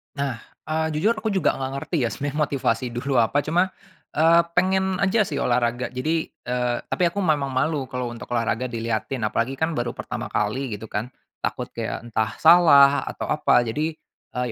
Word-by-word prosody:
Nah, 140 -4 -2 0.3
eee, 160 0 0
jujur 215 +9 +2
aku 215 -1 -2
juga 190 -5 +1
enggak 135 0 -3
ngerti 165 +5 -3
ya - - 0
sebenarnya 145 +1 -4
motivasi 135 -2 -1
dulu 135 +2 -1
apa 120 +5 +3
cuma, 180 +5 +1 0.4
eee, 165 +2 +5
pengen 190 +1 +1
aja 200 +2 +3
sih - - -3
olahraga. 120 0 0
Jadi 155 +6 -1 0.2
eee, 125 0 0
tapi - - -1
aku 175 - -12
memang 150 -6 +1
malu 135 0 -1
kalau 125 -2 -3
untuk 115 - -10
olahraga 115 +1 -1
dilihatin. 115 +1 -2
Apalagi 120 +5 -1
kan 160 +3 0
baru 120 -5 -1
pertama - - -5
kali 110 +2 -1
gitu 110 - -9
kan. 110 +2 -4 0.3
Takut - - -2
kayak - - -4
entah 110 -2 -1
salah 145 -4 +7
atau - - -5
apa. 135 -5 +3
Jadi, 155 +7 -2 0.4
eee, 125 - 0
140 Hz, 180 wpm, -23 LUFS, 120-160 Hz, 0.4 s, salah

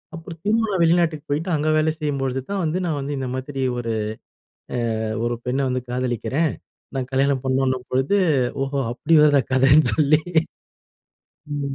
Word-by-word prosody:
அப்புறம் 165 0 -9
திரும்பவும் 220 +1 +1
நான் 185 -3 0
வெளிநாட்டுக்கு 165 -3 +2
போயிட்டு 155 +5 -1
அங்க 155 +1 0
வேல 155 +1 +2
செய்யும்பொழுது 135 -3 -1
தான் 200 -1 -1
வந்து. 160 +2 0
நான் 160 -4 -1
வந்து 140 +1 -4
இந்த 130 -1 -3
மாதிரி 135 +1 -5 0.2
ஒரு 115 -1 -3 1.1
அ - - -2 0.2
ஒரு 120 0 -1
பெண்ணை 130 +2 0
வந்து 125 0 -1
காதலிக்கிறேன். 130 +5 -1 0.4
நான் 130 -1 -3
கல்யாணம் 135 0 +1
பண்ணுன்ன 130 0 +1
பொழுது 135 +10 +2 0.5
ஓஹோ! 135 +1 -3
அப்படி 150 +6 -1
வருதா 145 -2 +5
கதைன்னு 135 +4 +5
சொல்லி. 155 0 +4 1.4
ம். 140 -1 -3
140 Hz, 155 wpm, -22 LUFS, 130-155 Hz, 1.4 s, வருதா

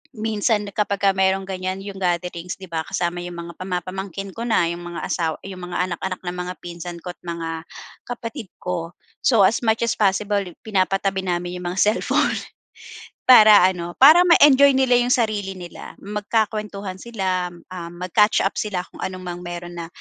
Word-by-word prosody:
minsan 215 -1 0
kapag 200 -1 0
ka 195 - +6
mayron 190 0 +2
ganyan, 185 0 -3
'yong 200 -1 -7
gatherings, 175 0 -2
'di 190 - -9
ba, 165 -1 -1
kasama 175 -2 -2
'yong 175 - -6
mga 170 0 -7
pama-pamangkin 190 +1 -4
ko 230 - -4
na, 220 -7 +3
'yong 170 0 -5
mga 175 0 -6
asawa 160 -2 -1
'yong 190 -2 -8
mga - - -2
anak-anak 185 +1 -4
ng 175 0 -4
mga 180 0 -4
pinsan 175 0 -7
ko't 180 -1 -6
mga 165 -2 -5 0.5
kapatid 230 -3 -6
ko, 170 -2 -4 0.3
so, 230 -6 +4
as 225 +6 +2
much 220 0 +2
as 235 - 0
possible, 205 0 +1 0.3
pinapatabi 195 -1 0
namin 175 0 -2
'yong 180 - -5
mga 190 - -3
cellphone, - - +1 0.9
para 215 -6 +9
ano, 175 -2 -3
para 310 +6 +9
ma-enjoy 280 -5 +7
nila 260 -2 +4
'yong 245 0 0
sarili 210 -5 -1
nila, 175 -1 -10
magkakuwentuhan 210 -1 -2
sila, 190 -6 -2
um, 170 0 -9
mag-catch 210 +4 +3
up 195 - -1
sila 190 -4 -2
kung - - -10
anumang 185 -1 -6
meron 175 0 -6
na, 170 - -5
190 Hz, 170 wpm, -22 LUFS, 175-210 Hz, 0.9 s, para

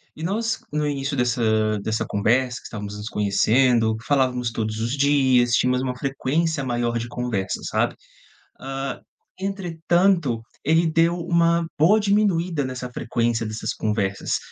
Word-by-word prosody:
E 160 - -8
nós, 220 +6 -1
no 150 0 0
início 140 0 -2
dessa 110 -4 +1
dessa 110 0 -1
conversa, 120 +5 +1
que - - -12
estávamos 105 -2 -7
nos 105 +1 -6
conhecendo, 110 +3 +2
falávamos 125 -4 +1
todos 110 -1 -3
os 120 +5 -2
dias, 130 -4 +3
tínhamos 125 +1 +2
uma 125 -1 -2
frequência 140 +3 -1
maior 120 -2 -1
de 115 +1 -3
conversas, 120 -6 -3
sabe. - - 0 0.7
Hã, 135 0 -4 0.4
entretanto, 175 - +1 0.2
ele 160 +3 +3
deu 165 +2 +2
uma 170 0 +2
boa 180 +9 +5
diminuída 190 -6 +1
nessa 130 -1 -5
frequência 115 -1 -1
dessas 110 +1 -3
conversas. 105 -2 -1
130 Hz, 135 wpm, -23 LUFS, 115-165 Hz, 0.7 s, boa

